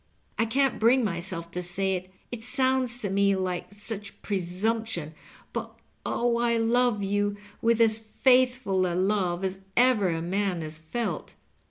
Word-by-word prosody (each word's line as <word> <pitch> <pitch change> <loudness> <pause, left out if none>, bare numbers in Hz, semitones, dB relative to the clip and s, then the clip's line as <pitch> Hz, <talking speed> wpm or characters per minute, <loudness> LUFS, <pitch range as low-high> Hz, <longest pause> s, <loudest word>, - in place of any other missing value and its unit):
I 225 - +4
can't 270 +2 +1
bring 240 +3 +4
myself 170 -3 -3
to 180 - -3
say 190 +2 0
it 185 0 -4
— - - -15
^it 235 - -5
sounds 255 0 +1
to 215 -5 -3
me 200 0 +3
like 185 -1 -3
such 205 0 -7
presumption 190 -2 -1 0.2
— - - -25
^but - - -3 0.3
oh, 235 -1 0
I 235 -1 +2
love 230 -2 +2
you 205 +1 0 0.2
with 230 0 +3
as 225 -1 +5
faithful 245 -4 +2
a 175 - -2
love 185 -2 +1
as 190 0 -2 0.2
ever 240 -6 +4
a 165 -1 -1
man 185 +1 -1
has 155 0 -7
felt. 225 +9 -4
205 Hz, 165 wpm, -27 LUFS, 185-235 Hz, 0.3 s, as